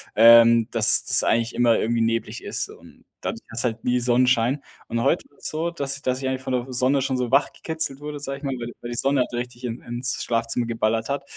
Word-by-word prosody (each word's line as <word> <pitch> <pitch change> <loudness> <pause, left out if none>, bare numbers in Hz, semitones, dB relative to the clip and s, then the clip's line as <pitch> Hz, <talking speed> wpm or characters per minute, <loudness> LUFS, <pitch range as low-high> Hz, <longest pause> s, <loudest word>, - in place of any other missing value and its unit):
ähm, 115 0 +7
dass 115 -2 +4
das - - +3
eigentlich 115 0 +1
immer 120 -1 +3
irgendwie 115 +1 0
neblig 115 0 -1
ist. - - -2
Und, - - -16 0.2
dadurch - - -5
hast 115 +1 -2
du - - +2
halt 110 0 -10
nie 125 0 +2
Sonnenschein 125 +2 +2 0.3
und 115 - -1
heute - - +2
ist - - -24
es - - +1
so, 165 +2 -2
dass 140 -4 -2
ich 140 - -10
dass 130 -1 -1
ich 130 - -2
eigentlich 130 0 -2
von 135 0 -5
der 125 +1 -2
Sonne 130 +2 +3
schon 130 0 -1
so 125 -1 -2
wach 140 +2 +3
gekitzelt 160 -4 -4
wurde, 150 0 -6
sage 140 -1 -5
ich - - -22
mal, 135 -2 -2
weil 120 - -5
die 120 - -8
weil 120 - -6
die 120 - -4
Sonne 135 0 +2
halt - - -2
richtig 120 +1 -5
in 120 0 -4
ins 120 +1 -3
Schlafzimmer 115 +1 -1
geballert 115 -1 -1
hat. 140 0 -2
125 Hz, 255 wpm, -23 LUFS, 115-135 Hz, 0.3 s, ähm